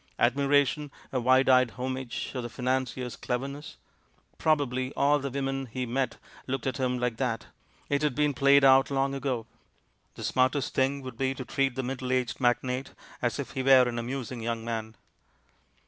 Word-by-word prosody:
Admiration, 140 +3 +2 0.2
a 130 - 0
wide 130 +2 +4
eyed 130 -1 +5
homage 130 -1 -4
of 130 - -3
the 120 - -5
financier's 125 0 -2
cleverness? 140 +4 -4 0.6
Prob 155 -1 +3
ably 130 -1 -2
all 145 +1 +4
the 140 0 -3
women 135 0 -2
he 125 +2 -4
met 125 0 -1 0.3
looked 135 -1 -3
at 130 -1 -1
him 125 -2 0
like 125 -2 -1
that 120 -3 -1 0.2
— - - -33
it 140 0 0
had 150 -4 0
been 150 -1 +2
played 140 +1 +5
out 135 0 +6
long 135 0 0
ago. 130 -4 -2 0.7
The - - -8
smartest 130 +1 +1
thing 135 +1 +1
would 130 -3 -8
be 135 0 0
to 130 - -6
treat 135 +2 0
the 130 - -2
middle 130 0 -3
aged 130 0 -1
magnate 125 +2 0 0.3
as 120 -2 0
if 140 -3 -5
he 130 - -3
were 130 -1 +6
an 120 -1 -2
amusing 125 0 -4
young 115 0 -3
man! 110 -1 -4
130 Hz, 180 wpm, -28 LUFS, 125-135 Hz, 0.7 s, out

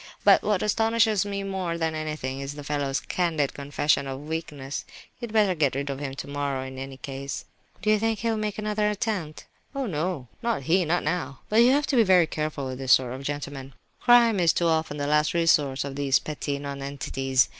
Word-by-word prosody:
But - - +6
what 210 -3 0
astonishes 220 -1 +2
me 200 -1 -3
more 190 -4 -2
than 160 -1 -1
anything 150 -4 -4
is 140 +1 -5
the 145 - -8
fellow's 140 -1 -1
candid 160 -6 0
confession 140 0 0
of 135 +2 -6
weakness. 150 -4 -4 0.4
You'd 235 -2 -6
better 210 -4 +3
get 150 -6 +1
rid 140 +1 -2
of 135 - -5
him 135 -2 -4
tomorrow, 140 -1 -3
in 130 0 -8
any 135 0 -7
case." 135 -1 -6 0.4
"Do 215 - +3
you 215 - +4
think 225 0 0
he 230 +3 -1
will 220 - -1
make 210 -1 -2
another 210 0 0
attempt?" 200 -7 -3 0.3
"Oh 275 -1 -1
no, 160 - -2
not 235 -12 -1
he, 175 +6 +2
not 175 +3 +1
now! 150 -4 -2
But 215 - +1
you 240 - +6
have 290 +1 +2
to 280 - -1
be 240 - +6
very 185 -4 +5
careful 155 -3 -3
with 130 0 -5
this 130 -1 +4
sort 125 -2 +3
of 130 - -7
gentleman. 140 -2 -5 0.2
Crime 235 -4 +5
is 170 -2 +4
too 170 - 0
often 160 -2 0
the 145 - -2
last 150 +2 +2
resource 150 -5 +3
of 140 -1 -6
these 140 -2 +3
petty 145 -1 -4
nonentities. 140 -2 -1
150 Hz, 210 wpm, -26 LUFS, 140-195 Hz, 0.4 s, But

